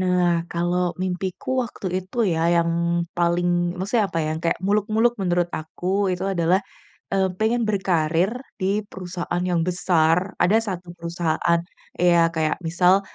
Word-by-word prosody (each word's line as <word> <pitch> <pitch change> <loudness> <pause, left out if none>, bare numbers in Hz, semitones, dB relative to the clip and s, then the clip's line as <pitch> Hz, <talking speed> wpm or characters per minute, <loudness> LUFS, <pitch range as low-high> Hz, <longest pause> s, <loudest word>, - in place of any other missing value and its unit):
Nah 175 -2 +2
kalau 175 +1 0
mimpiku 185 0 -4 0.2
waktu 220 - -8
itu 185 +5 -15 0.2
ya 160 - -1 0.2
yang 170 0 +2 0.5
paling, 175 0 +2 0.3
maksudnya 210 +4 +1
apa 165 - -3
ya, - - -1
kayak 165 - +1
muluk-muluk 215 +3 +2
menurut 175 -1 +1
aku 155 +3 -6 0.3
itu 180 +1 -3
adalah, 185 -1 +2 0.5
eee, 190 -1 +2
pengen 230 +2 +1
berkarier 175 -2 +1 0.3
di 200 +2 0
perusahaan 175 -1 -4
yang 170 -1 +2
besar. 175 0 +2
Ada 205 +5 +4 0.2
satu 175 0 -12
perusahaan, 170 0 0 0.4
ya 170 -1 +4
kayak 155 -1 0
misal, 180 +3 +4
180 Hz, 135 wpm, -23 LUFS, 170-190 Hz, 0.5 s, Ada